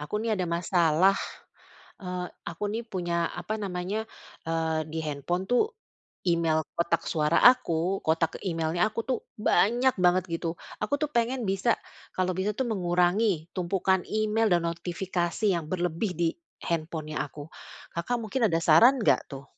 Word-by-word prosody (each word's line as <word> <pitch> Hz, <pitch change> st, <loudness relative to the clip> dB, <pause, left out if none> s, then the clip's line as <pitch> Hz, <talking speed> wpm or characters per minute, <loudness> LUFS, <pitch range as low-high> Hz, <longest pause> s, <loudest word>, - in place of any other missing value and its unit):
aku, 150 Hz, +8 st, -4 dB
nih, 220 Hz, +1 st, -1 dB
ada 185 Hz, -4 st, -1 dB
masalah, 170 Hz, +1 st, +3 dB, 0.9 s
eee, 180 Hz, -1 st, -4 dB, 0.2 s
aku, 170 Hz, +4 st, -5 dB
nih, 225 Hz, -, -2 dB
punya 175 Hz, -4 st, -1 dB
apa 195 Hz, +5 st, -3 dB
namanya, 200 Hz, +3 st, -3 dB, 0.4 s
eee, 160 Hz, -1 st, -1 dB
di 160 Hz, -, -3 dB
handphone, 155 Hz, +5 st, -2 dB
tuh, 245 Hz, +10 st, +4 dB, 0.6 s
email 165 Hz, -3 st, +2 dB, 0.2 s
kotak 170 Hz, 0 st, 0 dB
suara 150 Hz, -1 st, +1 dB
aku, 190 Hz, -7 st, +4 dB
kotak 160 Hz, 0 st, +1 dB
email-nya 170 Hz, +2 st, +1 dB
aku, 215 Hz, +1 st, -4 dB
tuh, 255 Hz, -3 st, +1 dB, 0.2 s
banyak 240 Hz, +4 st, +3 dB
banget 180 Hz, 0 st, +4 dB
gitu. 165 Hz, 0 st, -2 dB, 0.3 s
Aku, 215 Hz, +7 st, 0 dB
tuh, 300 Hz, -, 0 dB
pengen 240 Hz, +1 st, 0 dB
bisa, 195 Hz, +5 st, +2 dB, 0.4 s
kalau 185 Hz, 0 st, +1 dB
bisa, 200 Hz, +3 st, 0 dB
tuh, 265 Hz, -, 0 dB
mengurangi 180 Hz, -2 st, +1 dB
tumpukan 190 Hz, +1 st, +1 dB
email 215 Hz, +1 st, +1 dB
dan 175 Hz, -1 st, +2 dB
notifikasi 175 Hz, +3 st, -2 dB
yang 165 Hz, -, -3 dB
berlebih 180 Hz, +2 st, -1 dB
di 170 Hz, -1 st, +2 dB, 0.4 s
handphone-nya 155 Hz, -2 st, -3 dB
aku. 145 Hz, +1 st, -10 dB, 0.5 s
Kakak 170 Hz, +9 st, -1 dB
mungkin 225 Hz, +1 st, +1 dB
ada 165 Hz, -2 st, +1 dB
saran 230 Hz, -, +7 dB
nggak, 215 Hz, -, +2 dB
tuh? 135 Hz, -1 st, -8 dB
180 Hz, 145 wpm, -27 LUFS, 165-215 Hz, 0.9 s, saran